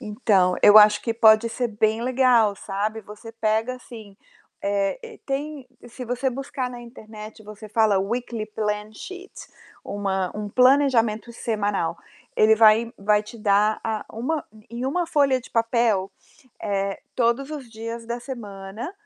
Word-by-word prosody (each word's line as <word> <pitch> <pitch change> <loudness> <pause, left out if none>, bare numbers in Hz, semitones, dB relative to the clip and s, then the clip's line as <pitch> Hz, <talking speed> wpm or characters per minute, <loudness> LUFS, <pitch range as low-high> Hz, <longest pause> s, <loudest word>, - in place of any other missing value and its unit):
Então, 205 -5 +1
eu 205 +1 +8
acho 210 0 +6
que 230 -1 -2
pode 220 0 +5
ser 240 +1 -2
bem 220 +1 0
legal, 245 -5 +3
sabe. 210 +4 -3
Você 210 +3 -11
pega, 225 +2 0
assim 220 -5 -12 0.5
eh, 205 - -2
tem 280 0 -4 0.2
se 250 +2 -8
você 250 +3 -1
buscar 260 0 -4
na 245 - -9
internet, 220 -2 -11
você 215 +1 -11
fala: 215 -2 +3
"Weekly 230 +2 -3
plan 210 0 -3
sheet" 375 - -10 0.5
uma 195 -2 -2
um 210 -1 -5
planejamento 250 -3 +3
semanal. 205 -7 -2 0.4
Ele 220 +1 +5
vai 225 +1 +5
vai 210 +1 +2
te 215 +2 -12
dar, 210 +1 +2
ah, 220 -1 -2
uma 275 +7 -2 0.3
em 240 +2 -5
uma 345 +5 -1
folha 280 -5 +2
de - - -15
papel, 230 -4 +1 0.5
eh, 195 -1 -2
todos 245 +3 0
os 285 -6 -7
dias 230 +1 -7
da 235 +1 -3
semana, 210 - -7
225 Hz, 145 wpm, -23 LUFS, 210-250 Hz, 0.5 s, eu